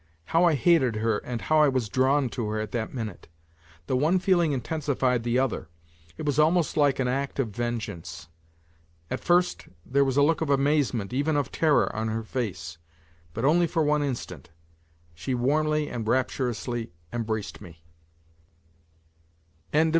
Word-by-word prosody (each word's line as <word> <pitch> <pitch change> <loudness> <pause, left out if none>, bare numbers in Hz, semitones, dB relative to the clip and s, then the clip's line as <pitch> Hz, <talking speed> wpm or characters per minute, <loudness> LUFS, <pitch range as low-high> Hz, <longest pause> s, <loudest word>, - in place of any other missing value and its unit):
How 165 - +3
I 165 -3 +4
hated 135 -4 +3
her 110 -1 0
and 120 -2 -5
how 155 0 +2
I 150 - +6
was 130 -5 0
drawn 130 +5 +2
to 115 -2 -3
her 110 0 -2
at 110 -1 -4
that 115 -2 -3
minute! 110 -7 -6 0.6
The 130 - -1
one 155 +8 +3
feeling 180 -4 +2
intensified 135 -3 0
the 120 +1 0
other. 130 -10 -1 0.5
It - - -5
was 145 0 0
almost 160 +2 +3
like 145 -3 +3
an 130 - 0
act 135 +2 -2
of 135 -5 0
vengeance. 100 -8 -5 0.8
At - - -2
first 175 +1 +1 0.2
there 140 +2 +2
was 135 0 0
a 145 - +6
look 165 +3 +2
of 160 - -1
amazement, 135 -6 +1
even 145 +3 +1
of 145 - -1
terror 155 -3 +2
on 110 +1 -1
her 110 +1 -2
face, 95 -9 -4 0.6
but 115 +4 -1
only 170 +4 +4
for 165 -1 0
one 150 0 +2
instant. 120 - -5 0.6
She 85 +11 -3
warmly 150 +4 +1
and 115 -5 -5
rapturously 120 -4 -1 0.2
embraced 110 -4 -3
me. 85 -4 -13
130 Hz, 160 wpm, -26 LUFS, 115-150 Hz, 0.8 s, I